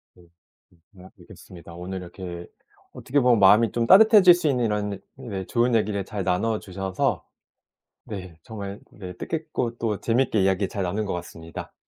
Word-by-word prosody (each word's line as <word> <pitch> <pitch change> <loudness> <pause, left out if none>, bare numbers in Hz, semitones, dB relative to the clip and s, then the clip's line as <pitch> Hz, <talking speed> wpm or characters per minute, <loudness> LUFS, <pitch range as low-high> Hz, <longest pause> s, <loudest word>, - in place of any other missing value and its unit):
네. 90 - -20 0.7
다음에 95 0 -14
뵙겠습니다. 85 -1 -14
오늘 90 +2 -6
이렇게 85 -1 -8 0.5
어떻게 145 +3 -1
보면 125 -4 +4
마음이 105 +3 +5
좀 115 -1 -1
따뜻해질 205 -2 +8
수 175 -2 -1
있는 125 -4 +1
이런 105 -2 -2
네 105 -8 -6
좋은 120 +3 +1
얘기를 105 -2 0
잘 100 -2 -4
나눠 105 +5 0
주셔서 95 +4 -3 0.8
네. 95 -6 -8
정말 100 -2 -7
네 90 -3 -9
뜻깊고 130 - -4
또 110 -4 -2
재밌게 115 -2 +1
이야기 95 +1 +1
잘 100 -1 -4
나눈 100 +4 -2
것 100 - -3
같습니다. 85 -2 -8
105 Hz, 335 characters per minute, -24 LUFS, 95-120 Hz, 0.8 s, 따뜻해질